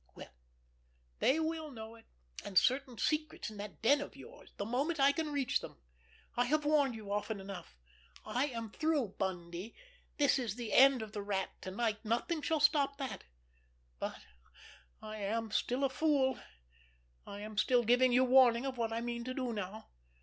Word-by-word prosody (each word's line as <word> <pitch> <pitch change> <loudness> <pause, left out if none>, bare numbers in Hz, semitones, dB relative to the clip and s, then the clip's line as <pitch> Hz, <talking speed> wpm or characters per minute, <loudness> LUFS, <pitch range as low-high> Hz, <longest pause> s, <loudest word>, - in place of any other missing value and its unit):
Well, - - -11 0.9
they 285 +5 +3
will 320 -1 -2
know 225 -4 -9
it, 230 0 -17 0.4
and 190 - -3
certain 255 +1 +3
secrets 305 -5 -1
in 215 - -10
that 205 +1 -8
den 285 +5 +5
of - - -7
yours, - - -13
the 200 - -3
moment 280 +8 -1
I 275 +1 +6
can 310 0 -2
reach 280 -3 +1
them. - - -10 0.6
I 245 - +2
have 300 +3 +1
warned 290 -5 +3
you 210 -2 -8
often 210 0 -2
enough. 190 - -9 0.5
I 245 +5 0
am 230 -5 -5
through, 305 -7 0
Bundy, 180 +1 -4 0.4
this 285 -2 +3
is 230 -5 -2
the 235 -3 -5
end 265 -3 +6
of 215 - -9
the 210 -2 -4
Rat 200 -2 -2
to - - -5
night, 220 +2 -1
nothing 240 +9 -1
shall 320 +1 0
stop 285 -2 +3
that—but - - -9 0.8
I 215 0 -6
am 220 +2 -2
still 250 +5 0
a 275 - +3
fool. 275 -4 +2 0.9
I 200 0 -7
am 215 +1 -7
still 245 +1 +3
giving 250 +2 +4
you 250 +1 +5
warning 255 -1 +5
of 260 -2 -4
what 225 -1 0
I 230 +1 -2
mean 235 0 -3
to 255 0 -4
do 255 -3 -2
now. 210 +1 -6
240 Hz, 180 wpm, -34 LUFS, 210-275 Hz, 0.9 s, I